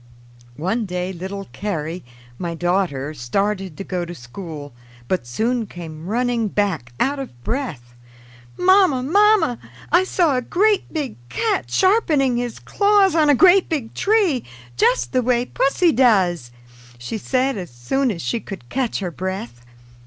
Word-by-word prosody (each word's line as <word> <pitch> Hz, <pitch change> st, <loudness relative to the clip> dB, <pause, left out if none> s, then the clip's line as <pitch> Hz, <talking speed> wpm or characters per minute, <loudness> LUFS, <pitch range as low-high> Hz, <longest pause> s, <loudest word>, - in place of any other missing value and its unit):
One 200 Hz, +8 st, -1 dB
day 180 Hz, +1 st, -3 dB
little 190 Hz, +3 st, -6 dB
Carrie, 170 Hz, -4 st, -4 dB, 0.4 s
my 170 Hz, -2 st, -3 dB
daughter, 170 Hz, -5 st, -1 dB
started 190 Hz, +7 st, -2 dB
to -, -, -5 dB
go 180 Hz, -2 st, -3 dB
to 175 Hz, 0 st, -7 dB
school, 145 Hz, +2 st, -9 dB, 0.3 s
but 180 Hz, -7 st, -1 dB
soon 225 Hz, -, -1 dB
came 165 Hz, -2 st, -9 dB
running 235 Hz, +1 st, 0 dB
back 190 Hz, -, -1 dB
out 280 Hz, +2 st, +1 dB
of 120 Hz, -, -8 dB
breath. 150 Hz, -, -4 dB, 0.6 s
"Mamma! 365 Hz, -8 st, +4 dB
Mamma! 385 Hz, -, +3 dB, 0.3 s
I 350 Hz, +3 st, +5 dB
saw 345 Hz, -6 st, +2 dB
a -, -, 0 dB
great 405 Hz, -, +1 dB
big 290 Hz, -7 st, -4 dB
cat 440 Hz, -3 st, -1 dB
sharpening 315 Hz, -, +3 dB
his 240 Hz, -1 st, -3 dB
claws 405 Hz, -2 st, +3 dB
on 310 Hz, -2 st, +3 dB
a 290 Hz, -, +6 dB
great 370 Hz, +6 st, +5 dB
big 275 Hz, -9 st, -3 dB
tree, 390 Hz, -, +2 dB, 0.3 s
just 120 Hz, 0 st, +2 dB
the -, -, +2 dB
way 245 Hz, 0 st, +1 dB
pussy 320 Hz, +7 st, +2 dB
does!" 190 Hz, -, +3 dB, 0.5 s
she 120 Hz, -, -5 dB
said 260 Hz, +4 st, 0 dB
as 180 Hz, -4 st, -6 dB
soon 185 Hz, -, -1 dB
as 175 Hz, -7 st, -4 dB
she 235 Hz, -, -1 dB
could 190 Hz, -, -9 dB
catch 255 Hz, -5 st, -1 dB
her 180 Hz, -3 st, -3 dB
breath. 160 Hz, -9 st, -5 dB
220 Hz, 150 wpm, -21 LUFS, 175-280 Hz, 0.6 s, a